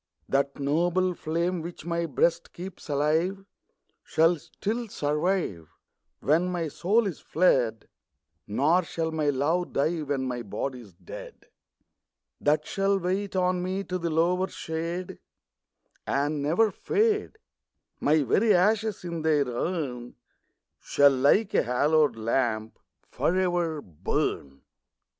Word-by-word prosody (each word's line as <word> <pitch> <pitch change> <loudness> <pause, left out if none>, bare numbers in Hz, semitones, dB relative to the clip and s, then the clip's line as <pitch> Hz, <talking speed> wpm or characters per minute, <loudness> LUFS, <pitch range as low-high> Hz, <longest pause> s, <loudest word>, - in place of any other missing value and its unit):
That 140 0 0
noble 175 +6 +1
flame, 170 +2 -1
which 170 -1 -8
my 170 0 -1
Ijreast 160 +4 0
keeps 180 -2 -9
alive. 160 +7 +1 0.6
Shall 165 +2 +3
still 225 - -4
survive 150 - -1 0.6
Wlien 165 +6 +3
my 170 -3 -2
soul's 195 +4 +1
fled; 125 -10 +1 0.6
Nor 150 - +3
shall 165 -1 -3
my 155 -2 0
love 155 +6 0
die, 160 +4 +1
when 140 -3 -2
ray 125 -1 -3
Ijody's 120 -5 -5
dead; 90 -1 -11 0.9
That 150 +1 +2
shall 195 0 +1
wait 190 +2 -2
on 180 -1 +1
me 190 +2 -2
to 185 -1 -3
the 170 -1 -2
lower 175 +4 +2
shade, 170 +3 -5 0.9
And 145 +2 0
never 175 +10 +2
fade: 430 - 0 0.6
My 150 +1 +3
very 210 - +3
ashes 210 +2 +2
in 170 -2 -4
their 155 -3 +2
urn 125 -2 -3 0.6
Shall, 140 0 +4
like 140 +11 +3
a - - +4
hallowed 145 +2 +2
lamp, 110 -1 -1 0.3
for 175 - 0
ever 175 -4 0
burn. 70 -4 -3
165 Hz, 120 wpm, -27 LUFS, 140-180 Hz, 0.9 s, Shall